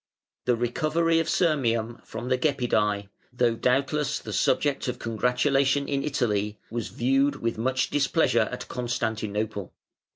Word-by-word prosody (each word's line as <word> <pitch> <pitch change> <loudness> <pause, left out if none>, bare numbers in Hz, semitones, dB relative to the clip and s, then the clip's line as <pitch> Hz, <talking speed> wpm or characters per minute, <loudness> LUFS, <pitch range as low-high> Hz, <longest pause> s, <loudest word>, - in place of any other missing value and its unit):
The 125 - +3
recovery 155 +8 +1
of 165 - -1
Sirmium 120 -9 +1
from 120 +2 -6
the 130 - +3
Gepidæ, 105 -8 +1 0.2
though 125 -1 +2
doubtless 140 +4 +1
the - - -7
subject 145 -2 +1
of 125 -1 -2
congratulation 130 +5 +1
in 140 -1 -1
Italy, 105 -7 -1
was 115 -1 -3
viewed 135 +3 +1
with 115 -4 -3
much 130 +3 0
displeasure 140 -6 +2
at 125 - -6
Constantinople. 110 -4 -3
125 Hz, 130 wpm, -26 LUFS, 115-140 Hz, 0.2 s, The